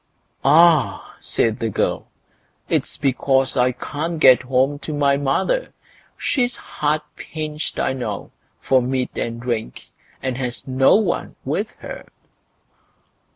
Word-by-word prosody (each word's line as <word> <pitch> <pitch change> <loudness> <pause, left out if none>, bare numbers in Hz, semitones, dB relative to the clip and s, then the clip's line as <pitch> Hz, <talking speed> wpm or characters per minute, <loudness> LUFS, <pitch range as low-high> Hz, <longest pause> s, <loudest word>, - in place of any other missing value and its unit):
"Ah!" 160 +1 +4
said 110 -1 0
the 115 - -1
girl, - - -1 0.6
"it's - - 0
because 135 0 +1
I 125 -1 +3
can't 155 +6 -4
get 130 -4 +7
home 130 +3 +1
to 155 0 -5
my 140 -1 +3
mother. 145 - 0 0.4
She's 250 -3 0
hard 150 +1 -1
pinched, 155 -1 -5
I 130 - +1
know, 110 -6 -5 0.3
for 130 -1 +3
meat 130 +1 -2
and 115 0 -3
drink, 115 - -4 0.3
and 130 -2 -3
has 125 -2 -4
no 130 0 +4
one 215 +1 0
with - - -1
her." - - -8
135 Hz, 125 wpm, -21 LUFS, 125-150 Hz, 0.6 s, get